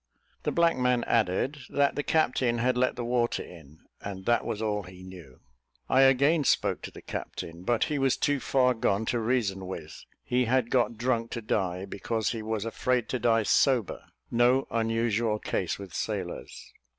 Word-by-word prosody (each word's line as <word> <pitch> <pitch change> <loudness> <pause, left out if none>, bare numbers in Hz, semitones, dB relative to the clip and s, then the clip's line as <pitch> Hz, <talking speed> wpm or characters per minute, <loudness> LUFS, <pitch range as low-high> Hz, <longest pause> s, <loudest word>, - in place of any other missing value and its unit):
The - - -1
black 170 -3 +3
man 125 -1 +2
added, 115 +6 0
that 140 0 +2
the 145 - -1
captain 130 -6 +1
had 125 +2 +1
let 130 +1 +1
the 120 - -4
water 120 -1 0
in, 80 -3 -14 0.2
and 95 -2 -7
that 120 - +2
was 105 - -3
all 105 -2 -1
he 90 0 -12
knew. 90 -8 -12 0.5
I 130 - +5
again 140 +4 +4
spoke - - +1
to - - -6
the - - -13
captain, 85 +1 -6
but 115 +5 +1
he 150 -2 -1
was 135 -1 +2
too 145 -1 +1
far 125 -1 +2
gone 110 -2 0
to 120 - +1
reason 110 -5 -1
with: 95 - -8 0.2
he 125 0 +1
had 120 0 +1
got 120 -2 +1
drunk 115 -1 0
to 120 - -4
die, 95 -3 -1
because 110 +3 -2
he 115 -2 -4
was 110 -1 -3
afraid 125 +1 -1
to 130 - -1
die 115 -1 +3
sober 125 0 +2 0.3
no 125 +3 +3
unusual 115 -1 0
case 95 -4 -2
with 95 -4 -10
sailors. 95 -5 -5
115 Hz, 180 wpm, -28 LUFS, 100-125 Hz, 0.5 s, I